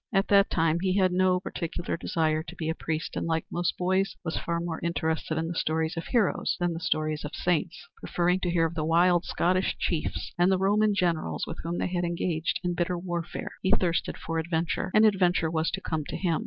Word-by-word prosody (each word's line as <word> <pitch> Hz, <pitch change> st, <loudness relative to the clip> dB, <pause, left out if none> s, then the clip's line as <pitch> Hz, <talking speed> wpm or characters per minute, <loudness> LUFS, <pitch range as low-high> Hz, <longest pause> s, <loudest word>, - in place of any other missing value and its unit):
At 195 Hz, -2 st, +1 dB
that 200 Hz, 0 st, +5 dB
time 165 Hz, 0 st, +2 dB
he 185 Hz, +1 st, +1 dB
had 185 Hz, -2 st, +3 dB
no 185 Hz, 0 st, +3 dB
particular 175 Hz, -1 st, -4 dB
desire 160 Hz, -2 st, 0 dB
to 160 Hz, -, -10 dB
be 160 Hz, -1 st, -3 dB
a -, -, +1 dB
priest, 160 Hz, 0 st, -4 dB
and, -, -, -2 dB
like 160 Hz, -1 st, 0 dB
most 175 Hz, 0 st, -1 dB
boys, 190 Hz, +2 st, +1 dB
was 160 Hz, -, -2 dB
far 170 Hz, 0 st, -2 dB
more 170 Hz, -1 st, -3 dB
interested 160 Hz, -2 st, -1 dB
in 160 Hz, 0 st, -1 dB
the 170 Hz, -, -3 dB
stories 160 Hz, +1 st, 0 dB
of 165 Hz, -, -5 dB
heroes 230 Hz, -7 st, +1 dB
than 175 Hz, -1 st, 0 dB
the 165 Hz, -, -5 dB
stories 155 Hz, -3 st, -1 dB
of 150 Hz, -, -6 dB
saints, 175 Hz, 0 st, -1 dB
preferring 180 Hz, +1 st, 0 dB
to 180 Hz, -, -1 dB
hear 170 Hz, -1 st, +2 dB
of 165 Hz, -, -2 dB
the 160 Hz, -2 st, -2 dB
wild 175 Hz, +2 st, +3 dB
Scottish 185 Hz, +2 st, +1 dB
chiefs 160 Hz, -4 st, -2 dB
and 175 Hz, +2 st, +5 dB
the 190 Hz, -, +3 dB
Roman 205 Hz, +2 st, +3 dB
Generals 165 Hz, -, 0 dB
with -, -, -7 dB
whom 170 Hz, +2 st, -3 dB
they -, -, 0 dB
had 180 Hz, -1 st, -1 dB
engaged 170 Hz, -1 st, -1 dB
in 175 Hz, 0 st, 0 dB
bitter 175 Hz, +1 st, -1 dB
warfare. 175 Hz, -1 st, -4 dB
He 190 Hz, -, 0 dB
thirsted 170 Hz, -2 st, 0 dB
for 165 Hz, 0 st, -3 dB
adventure, 165 Hz, +2 st, -1 dB
and 215 Hz, +1 st, +7 dB
adventure 180 Hz, -5 st, +3 dB
was 160 Hz, 0 st, +1 dB
to 195 Hz, -, -4 dB
come 160 Hz, -4 st, -2 dB
to -, -, -5 dB
him. 170 Hz, -3 st, 0 dB
170 Hz, 220 wpm, -27 LUFS, 160-180 Hz, -, and